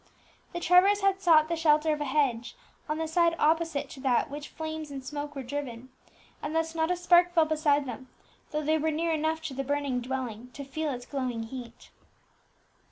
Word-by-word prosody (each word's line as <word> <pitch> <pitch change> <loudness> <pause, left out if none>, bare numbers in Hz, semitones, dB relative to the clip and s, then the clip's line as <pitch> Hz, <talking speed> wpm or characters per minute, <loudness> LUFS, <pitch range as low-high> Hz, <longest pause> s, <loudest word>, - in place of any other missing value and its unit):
The 345 - -4
Trevors 365 +4 +5
had 390 -1 +2
sought 315 -4 +5
the 335 - -1
shelter 310 -1 +3
of 300 - -4
a - - -1
hedge, 260 - 0 0.3
on 305 - -1
the 320 0 -2
side 335 +1 +3
opposite 315 -2 +1
to 275 - -10
that 255 -3 +2
to - - -18
which 290 +1 -6
flames 315 -1 -6
and 270 -2 -7
smoke 290 +1 -5
were 270 - -4
driven; 255 -2 -5 0.5
and 300 +2 -4
thus 325 0 0
not 320 0 0
a 360 - +2
spark 350 0 +4
fell 325 -2 +5
beside 300 -2 +2
them, 260 0 -7 0.4
though 305 0 -2
they 315 +2 +2
were 315 +1 +1
near 325 +2 0
enough 315 +1 -1
to 310 -4 -4
the 275 +1 -3
burning 280 -2 -1
dwelling 250 -2 -4
to 280 - -7
feel 305 +3 -3
its 245 -2 -6
glowing 255 -4 -3
heat. 240 0 -9
300 Hz, 205 wpm, -28 LUFS, 265-320 Hz, 0.5 s, Trevors